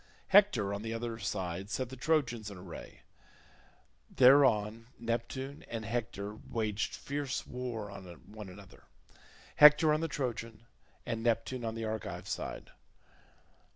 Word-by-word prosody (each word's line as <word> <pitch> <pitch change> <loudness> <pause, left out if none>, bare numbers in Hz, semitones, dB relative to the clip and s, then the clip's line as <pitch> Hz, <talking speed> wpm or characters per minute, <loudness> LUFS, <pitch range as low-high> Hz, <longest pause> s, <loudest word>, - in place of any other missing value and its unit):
Hector 160 - +5
on 100 - -4
the 115 +1 -3
other 115 -1 -4
side 95 -1 -3
set 130 +3 -2
the 130 - -8
Trojans 125 -6 0
in 100 - -9
array. 90 -2 -10 1.1
Thereon 115 -5 +5
Neptune 120 +4 -3
and 115 -2 -4
Hector 110 -3 -3 0.2
waged 110 -2 -1
fierce 140 -1 -3
war 120 -5 -5
on 100 -1 -9 0.2
one 105 -2 -9
another—Hector 150 - +2
on 155 - +2
the 165 - 0
Trojan 115 -5 -4 0.4
and 115 -2 -2
Neptune 120 +2 0
on 110 -1 -3
the 115 0 -3
Argive 110 -2 -4
side. - - -5
115 Hz, 125 wpm, -32 LUFS, 105-130 Hz, 1.1 s, Hector